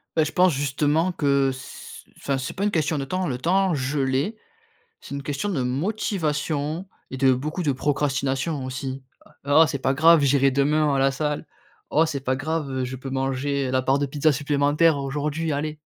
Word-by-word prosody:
Heu, 160 - +4
je 150 - -4
pense 180 -3 +4
justement 145 +5 +1
que 140 -5 +2
s 130 0 -10
enfin, 140 -1 -2
c'est 130 +1 -4
pas 195 - -4
une 210 - +1
question 155 -1 0
de 135 - -2
temps. 185 +5 -2
Le 125 -3 -2
temps 185 +5 +2
je 140 +1 -1
l'ai. 135 +12 0 0.6
C'est 140 - -9
une 140 - -4
question 145 +9 -3
de 145 -10 -1
motivation 155 - -2 0.2
et 130 - -5
de 130 0 +4
beaucoup 155 +8 -2
de 145 -4 +1
procrastination 140 +1 -1
aussi: 130 +1 -5 0.4
«Heu, 145 - 0
oh, 160 - +8
c'est 140 -3 -3
pas 135 +1 0
grave 160 +2 +6
j'irai 140 0 +4
demain 145 +2 +2
à - - +1
la 135 0 +3
salle. 150 +2 -3 0.4
Oh 160 +2 +4
c'est 145 -4 -3
pas 130 0 0
grave, 155 +1 -2
heu, 130 -1 -2
je 130 +1 -5
peux 135 +2 -8
manger, 135 +1 -1
heu, - - -2
la 130 0 +2
part 135 +2 +2
de 145 - 0
pizza 150 +3 +1
supplémentaire 145 +2 +2
aujourd'hui, 145 +3 -2
allez». 150 +1 -3
145 Hz, 205 wpm, -24 LUFS, 135-155 Hz, 0.6 s, oh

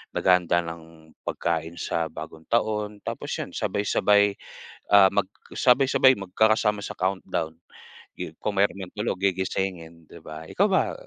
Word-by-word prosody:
naghahanda 90 -2 +3
ng 80 -1 -11 0.2
pagkain 80 0 -2
sa 85 -1 -2
Bagong 80 +1 -10
Taon. 105 -2 -1
Tapos - - -5
yun - - -5
sabay-sabay, 100 0 +2 0.6
ah, 100 -1 +8
mag 100 -2 +1 0.3
sabay-sabay 130 -1 +4
magkakasama 105 +2 +1
sa - - -6
countdown, 95 -4 -2 0.6
'yun, - - -6
kung 100 -2 -1
meron 100 - +3
man 95 -2 -7
tulog 105 -3 -2
gigisingin, 90 -3 -2
'di 85 - -12
ba? 80 +1 -8
Ikaw 200 - +2
ba, 190 - +2
95 Hz, 135 wpm, -25 LUFS, 85-105 Hz, 0.6 s, ah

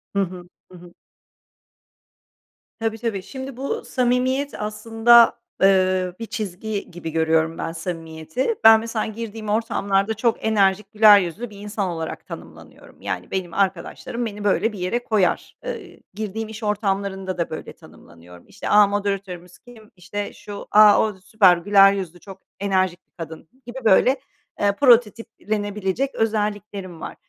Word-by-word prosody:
Hı - - +2
hı, 180 -1 -7 0.3
hı 180 - -12
hı. 175 0 -15 1.9
Tabii, 225 0 -2
tabii. 215 -4 -3
Şimdi, 265 +1 -8
bu 275 +1 -4
samimiyet 255 +2 0
aslında, 225 +2 +4 0.2
ııı, 185 -2 +3
bir 230 - -4
çizgi 205 -1 -5
gibi 165 -2 -7
görüyorum 160 0 +1
ben 165 - -3
samimiyeti. 165 - -4
Ben, 220 0 +9
mesela, 225 -1 -3
girdiğim 220 -1 -6
ortamlarda 210 -2 0
çok 225 0 -1
enerjik, 200 -1 +2
güler 210 -1 +7
yüzlü 195 +6 -4
bir 200 -1 -13
insan 205 -2 -3
olarak 165 -2 -5
tanımlanıyorum. 80 -1 -12
Yani, - - -5
benim 180 -3 -3
arkadaşlarım 200 +5 -2
beni, 210 -1 -6
böyle, 215 +2 +1
bir 195 - -8
yere 235 +7 -2
koyar. 200 -5 0
Eee, - - -7
girdiğim 215 +1 -5
iş 220 0 -9
ortamlarında 195 -3 -2
da 170 - -2
böyle 155 - -7
tanımlanıyorum. 85 +1 -17
İşte, - - -7
a, 210 -1 +6
moderatörümüz 195 -3 -4
kim, 225 -3 -17
işte, 200 +3 -6
şu, 205 -1 -9
a, 210 -1 +7
o 215 -1 0
süper 190 -2 +4
güler 195 +2 +5
yüzlü, 180 -3 -5
çok 195 +1 -12 0.2
enerjik 185 -3 0
bir - - -51
kadın 160 -1 -9 0.2
gibi, 245 +2 -8
böyle, 255 +7 +4 0.4
eee, 205 0 +3
prototiplenebilecek 215 -2 +1
özelliklerim 205 -5 -2
var. - - -7
205 Hz, 145 wpm, -22 LUFS, 185-220 Hz, 1.9 s, Ben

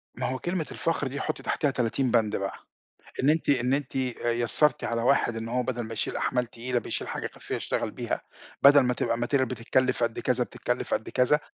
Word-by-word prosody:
ما - - -3
هو 130 0 -2
كلمة 175 -3 -2
الفخر 165 -4 -1
دي 140 +2 -4
حُطي 155 - -3
تحتها 145 -3 +1
30 125 +1 0
بَنْد 110 -3 +2
بقى. 100 0 -3 0.6
إن 140 - +5
أنتِ 160 +1 0
إن 125 -1 +3
أنتِ 140 -2 -3
آآ 125 -2 -1
يسَّرتِ 120 +4 +2
على 115 0 -1
واحد 120 -2 +2
إن 115 0 -4
هو 125 +1 0
بَدَل 120 -1 -2
ما 110 0 -6
يشيل 110 - -2
أحمال 125 -1 0
تقيلة 120 +1 -2
بيشيل - - -4
حاجة - - -3
كافية - - -5
يشتغل - - -2
بيها، - - -3 0.4
بَدَل 140 +1 +9
ما 125 -2 +1
تبقى 115 - 0
material 125 +3 +1
بتتكلِّف 130 0 0
قد 115 -1 0
كذا، 125 -1 +1
بتتكلِّف 110 - -2
قد - - -3
كذا. 135 +4 +3
125 Hz, 210 wpm, -27 LUFS, 120-135 Hz, 0.6 s, بَدَل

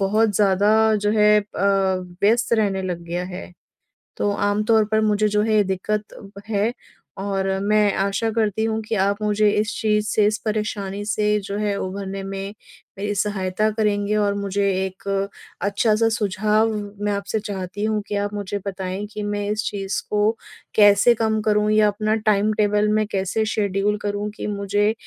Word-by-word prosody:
बहुत 210 +2 +2
ज़्यादा 205 0 +3 0.2
जो 210 0 0
है 210 -1 +5
अ, - - -10 0.8
व्यस्त 235 +4 +3
रहने 200 -4 +1
लग 175 -2 -4
गया 175 +1 -3
है। 180 0 -8 0.7
तो 205 - +1
आम 205 +1 0
तौर 220 -1 +3
पर 220 0 +3
मुझे 215 0 +2
जो 210 0 +1
है 215 -2 +3
दिक्कत 200 +1 -4 0.2
है 220 +2 0 0.5
और 195 -1 -1
मैं 210 0 +3
आशा 200 +3 0
करती 220 -1 0
हूँ 220 0 0
कि 220 +1 -3
आप 200 +2 +1
मुझे 210 0 +2
इस 210 +2 0
चीज़ 210 -1 +1
से, 210 0 +2
इस 215 +1 0
परेशानी 205 -2 -2
से 210 0 0 0.2
जो 200 +1 -5
है 210 -1 -1
उभरने 195 +1 -5
में 195 +1 -5 0.4
मेरी 205 +1 -2
सहायता 200 0 0
करेंगे। 210 -1 0
और 205 -1 +2
मुझे 200 0 0 0.2
एक 190 +1 -9 0.5
अच्छा-सा 215 +3 +2
सुझाव 215 +1 +1 0.3
मैं 205 - +1
आपसे 200 +2 -2
चाहती 195 -1 -5
हूँ 215 -1 0
कि 205 - -3
आप 205 +1 -2
मुझे 205 0 -3
बताएँ 190 +1 -4
कि 210 - -4
मैं 205 0 -2
इस 215 +1 -1
चीज़ 195 -1 -3
को 210 +1 +2 0.4
कैसे 205 +3 +6
कम 220 -1 0
करूँ? 210 -1 +2
या 215 0 +4
अपना 215 +1 0
टाइम 215 -1 +2
टेबल 210 0 +2
मैं 215 0 +2
कैसे 195 +3 0
शेड्यूल 205 0 0
करूँ 205 +1 -2
कि - - -4
मुझे 205 +1 0
205 Hz, 170 wpm, -22 LUFS, 200-215 Hz, 0.8 s, कैसे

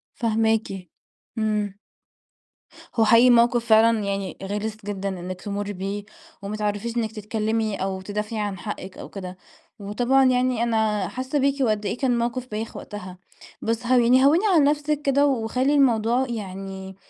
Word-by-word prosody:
فاهماكِ، 220 -4 0 0.5
امم. 210 -2 0 1.2
هو 225 - +4
حقيقي 230 +3 +6
موقف 240 0 +4
فعلًا 225 0 +5
يعني 195 -1 -3
غِلِس 210 +2 -3
جدًا 200 -1 -3
إنِك 185 -1 -6
تمُري 205 0 -4
بيه 200 +2 -4 0.4
وما 205 +2 -4
تعرفيش 210 +3 -2
إنِك 220 -2 -1
تتكلمي 220 0 -2
أو 190 0 -3
تدافعي 210 +3 -4
عن 205 -2 -3
حقك 190 -1 -7
أو - - -8
كده، 185 -2 -8 0.4
وطبعًا 245 +7 +2
يعني 250 -2 +2
أنا 220 -3 +1
حاسة 260 +3 -2
بيكِ 280 0 +1
وقد 215 -5 +1
إيه 200 - -2
كان 245 -3 +1
موقف 240 +2 -2
بايخ 215 +1 -5
وقتها. 185 -3 -8 0.4
بس 230 +1 -2
هَوِّني 250 +1 +5
هَوِّني 325 +8 +4
عن 310 -4 +5
نفسِك 295 0 +1
كده 280 +1 +3
وخلّي 255 +2 +1
الموضوع 245 -2 +3
يعني 195 -3 -6
220 Hz, 145 wpm, -24 LUFS, 205-245 Hz, 1.2 s, حقيقي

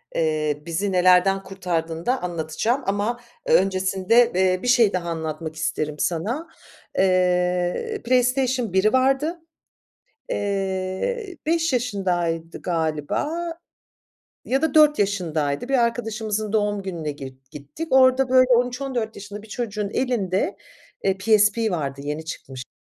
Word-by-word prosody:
eee, 155 -2 0
bizi 180 +4 -1
nelerden 185 +1 +4
kurtardığını 170 -4 -3
da 255 +1 +1
anlatacağım 175 - -1
ama 205 +5 -1 0.3
ö - - +2
öncesinde, 190 +5 +3
eee, 185 0 +2
bir 250 - -2
şey 235 -5 +4
daha 170 -2 -2
anlatmak 160 -1 -4
isterim 155 -1 -2
sana. 225 - -1 0.5
Eee, 180 - +1
Playstation 250 -3 +1
1'i 210 +5 +3
vardı. 270 +6 +2 0.9
Eee, 200 - -2
5 325 -1 +1
yaşındaydı 180 -9 -1
galiba 160 - -1 1.2
ya 270 +4 0
da 320 -4 0
4 300 -1 +6
yaşındaydı. 170 - -1
Bir 270 - +2
arkadaşımızın 220 -2 -2
doğum 205 -2 0
gününe 170 -5 -4
git 135 -1 -11
gittik. 150 - -8
Orada 260 0 +5
böyle 255 0 +5
13-14 245 -1 0
yaşında 205 +1 -8
bir 220 - -15
çocuğun 210 -3 -3
elinde, 205 -8 -1 0.5
eee, 195 -1 +2
PSP 215 +2 +3
vardı, 140 -5 -3
yeni 150 +2 -4
çıkmıştı. 130 -5 -8
195 Hz, 120 wpm, -23 LUFS, 170-245 Hz, 1.2 s, 4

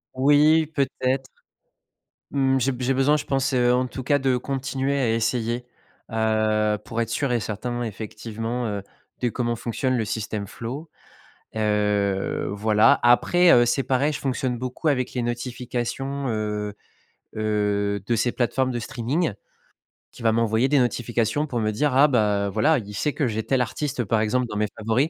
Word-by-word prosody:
Oui, 150 +4 +4
peut-être, 135 -3 -1 1.0
mmh, 135 -1 +2
j'ai 135 +2 +2
be 125 - -6
j'ai 130 +2 +1
besoin 135 +3 +3
je 150 - -4
pense, 135 0 0
heu, 125 -1 +3
en 125 0 +1
tout 130 - -7
cas, 145 +1 +2
de 130 -1 +2
continuer 135 +1 -2
à 125 -5 +1
essayer, 115 +1 -1 0.5
heu, 110 -1 +1
pour 115 - -3
être 115 - -1
sûr 130 +2 0
et 120 - +1
certain, 120 +4 -4
effectivement, 115 +2 -4
heu, 100 -2 -3 0.4
de 125 - +1
comment 120 0 -2
fonctionne 125 +3 -1
le 115 - 0
system 105 -1 -3
flow, 130 - -7 0.7
heu, 105 -2 0
voilà, 105 +1 +4
après, 170 +9 +5
heu, 120 0 +6
c'est 125 +3 +1
pareil, 140 +3 +1
je - - -4
fonctionne 130 -2 -1
beaucoup 125 +6 -4
avec 130 -4 +1
les 125 - -1
notifications, 125 +3 -3
heu 105 -2 -2 0.6
heu, 105 -2 0
de 120 - +2
ces 115 +3 +1
plateformes 130 +2 0
de 120 - -2
streaming, 125 - -1 0.8
qui - - -14
va 115 - +3
m'envoyer 115 +3 +2
des 145 - +3
notifications 120 +3 0
pour 120 -5 -2
me 110 -1 0
dire, 140 +6 0
ah, 145 +3 +7
bah 105 -6 +1
voilà, 110 +10 +3
il 105 -3 -6
sait 140 +9 -1
que 145 - 0
j'ai 110 0 -2
tel 130 +2 +1
artiste, 135 +2 -2
par 110 +1 +1
exemple, 125 +4 +1
dans 105 -2 -5
mes 105 - +1
favoris, 115 +8 +1
120 Hz, 170 wpm, -24 LUFS, 110-135 Hz, 1.0 s, ah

